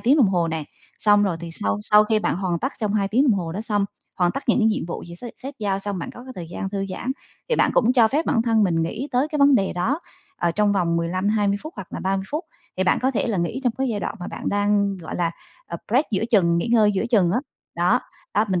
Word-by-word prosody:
tiếng 265 +6 +4
đồng 240 -10 +5
hồ 175 -3 +1
nè. 160 -2 -3 0.3
Xong 205 -1 +4
rồi 190 -5 0
thì 170 - -6
sau 100 0 0
sau 210 - +5
khi 215 0 +2
bạn 210 - 0
hoàn 180 -2 -1
tất 265 - -2
trong 210 -1 0
2 200 -2 +1
tiếng 240 +6 +3
đồng 255 - +4
hồ 165 -3 -4
đó 195 - -4
xong, 210 -2 0 0.3
hoàn 175 -1 +2
tất 275 - -4
những - - +4
cái 220 - +3
nhiệm 215 -6 0
vụ 175 - -5
gì 170 - -9
sếp 235 +7 -8
sếp 275 +2 -8
giao 200 -2 -1
xong, 200 -1 -3
bạn - - -5
có 245 - -12
cái 260 - -9
thời 170 -2 -6
gian 190 - -4
thư 195 -1 -2
giãn 245 +7 -3 0.4
thì 475 - +1
bạn - - +3
cũng 240 +1 +4
cho 235 -4 +5
phép 300 +6 0
bản 230 - +2
thân 225 -2 +3
mình 165 -3 +1
nghĩ 225 - -3
tới 255 +4 +2
cái 305 -1 -3
vấn 280 -1 +6
đề 195 -5 +2
đó, 235 - -1 0.4
ờ, 170 - +1
trong 205 +3 +2
vòng 170 -4 +1
15-20 200 +4 +1
phút 310 - -7
hoặc 195 -2 -7
là - - -4
30 190 0 -1
phút. 310 +4 -2 0.3
Thì 185 - +1
bạn 180 - +3
có 260 - +3
thể 250 - -1
là 215 -5 -1
nghĩ 170 +9 -2
trong 245 - +2
cái 265 0 +1
giai 210 -4 -2
đoạn - - -3
mà 175 - -5
bạn - - -5
đang, 205 -1 +1
gọi 165 - -6
là, 170 -1 +1 0.4
à, - - -5
break 265 +6 +3
giữa 210 0 0
chừng, 170 -7 +4
nghỉ 170 - -1
ngơi 215 -3 +5
giữa 200 +3 -1
chừng 195 -8 +4
á. 235 - +2 0.4
Đó, 175 +1 +3 0.3
đó, 210 - +3
mình 185 -2 +1
205 Hz, 285 wpm, -23 LUFS, 180-235 Hz, 0.4 s, vấn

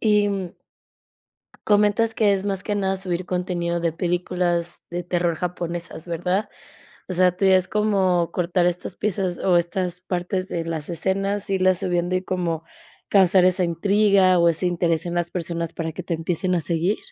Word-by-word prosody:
y, 205 -4 +1 1.1
comentas 210 +2 +3
que 210 -2 +3
es 195 0 -3
más 195 -2 -1
que 210 - -1
nada 195 -1 0
subir 185 -1 -3
contenido 175 -1 -2
de 170 -1 0
películas 175 0 -1
de 175 0 -4
terror 175 -1 0
japonesas, 175 -1 -5
¿verdad? 180 +4 -1 0.6
O 185 - -3
sea, 180 0 +4
¿tú 195 - +1
ya 190 0 +6
es 185 -1 +1
como 190 -5 +1
cortar 175 0 +1
estas 180 +1 -2
piezas 190 -4 -1
o 185 -2 +2
estas 180 +1 -2
partes 185 +1 -2
de 165 - -3
las 160 -3 -4
escenas, 195 +4 -1
irlas 185 -1 +3
subiendo 175 0 0
y 185 - -2
como 175 -4 -2 0.5
causar 190 -2 +5
esa 185 0 +2
intriga 195 +1 +3
o 170 - +5
ese 170 +3 -1
interés 170 -2 0
en 175 - -3
las 175 -1 -1
personas 170 -2 -3
para 165 -1 -3
que 180 - -6
te 180 - -4
empiecen 175 +3 -1
a - - +1
seguir? 170 +6 0
180 Hz, 170 wpm, -23 LUFS, 170-190 Hz, 1.1 s, ya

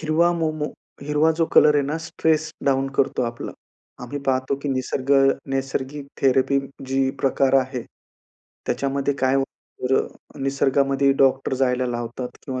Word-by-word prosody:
हिरवा 165 +2 +2
मोमो, 155 -3 -1 0.4
हिरवा 150 +2 +2
जो 165 - +4
कलर 150 0 +7
आहे 145 - +3
ना, 145 +3 -2
स्ट्रेस 155 -1 0
डाउन 135 0 +2
करतो 130 - +2
आपला. 115 -1 -4 0.5
आम्ही 125 +4 -5
पाहतो 130 +1 +1
की 145 - -2
निसर्ग 130 0 -2 0.4
नैसर्गिक 135 +1 -3 0.2
थेरपी 135 +1 +3 0.3
जी 135 0 +1
प्रकार 135 0 +2
आहे, 130 -1 -4 0.8
त्याच्यामध्ये 140 +1 -1
काय 130 0 +3
होतं 135 0 +2 0.4
बरं, 135 +1 -2
निसर्गामध्ये 135 0 +2
डॉक्टर 135 0 +2
जायला 125 -1 +1
लावतात 120 +1 -5
किंवा 130 -2 -3
135 Hz, 140 wpm, -23 LUFS, 130-145 Hz, 0.8 s, कलर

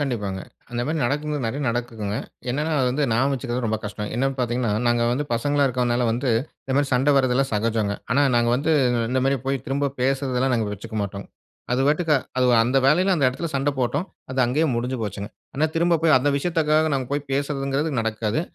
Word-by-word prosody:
கண்டிப்பாங்க, 105 -9 -2 0.3
அந்த 120 0 -3
மாரி 160 +1 -1
நடக்கும் 145 +2 -1
நெறைய 135 +6 -3
நடக்குதுங்க. 115 -3 -3 0.3
என்னனா 150 +5 -1
அது 125 - +2
வந்து 145 +3 0
நியாபக 130 +5 +2
வச்சுக்குறது 125 -1 -3
ரொம்ப 110 0 -1
கஷ்டம். 105 0 -5
என்னன்னு 135 +2 0
பாத்தீங்கனா, 120 -2 0 0.2
நாங்க 120 0 +2
வந்து 145 +4 -1
பசங்களா 145 +4 +1
இருக்குறதனால 125 -1 0
வந்து, 125 +2 -1 0.3
இந்த 130 - -2
மாரி 145 -1 +2
சண்ட 135 +4 +3
வரதெல்லாம் 135 0 +2
சகஜம்ங்க. 105 -1 0 0.2
ஆனா 140 +2 +3
நாங்க 120 0 +3
வந்து, 155 +4 +1 0.4
இந்த 130 0 +1
மாரி 135 0 +2
போயி 135 0 0
திரும்ப 140 +1 0
பேசுறதெல்லாம் 130 -1 +1
நாங்க 110 -3 0
வச்சுக்க 110 +2 -8
மாட்டோம். 100 0 -6 0.5
அது 125 - +1
பாட்டுக்கா 155 +1 +2 0.2
அது 130 0 +3 0.2
அந்த 125 +3 0
வேலையில 180 +7 +4
அந்த 140 - +3
எடத்துல 165 +6 -4
சண்ட 140 +1 +1
போட்டோம். 140 +8 0 0.2
அது 130 - -4
அங்கேயே 150 +7 +1
முடிஞ்சு 125 +2 -2
போச்சுங்க. 100 0 -4 0.3
ஆனா 155 +3 +2
திரும்ப 170 0 +3
போயி 165 -2 +4
அந்த 145 +3 +1
விஷயத்துக்காக 155 0 +1
நாங்க 130 -2 -1
போயி 145 0 0
பேசுதுங்றது 140 +1 -1
நடக்காது. 110 +3 -1
130 Hz, 190 wpm, -23 LUFS, 120-145 Hz, 0.5 s, வேலையில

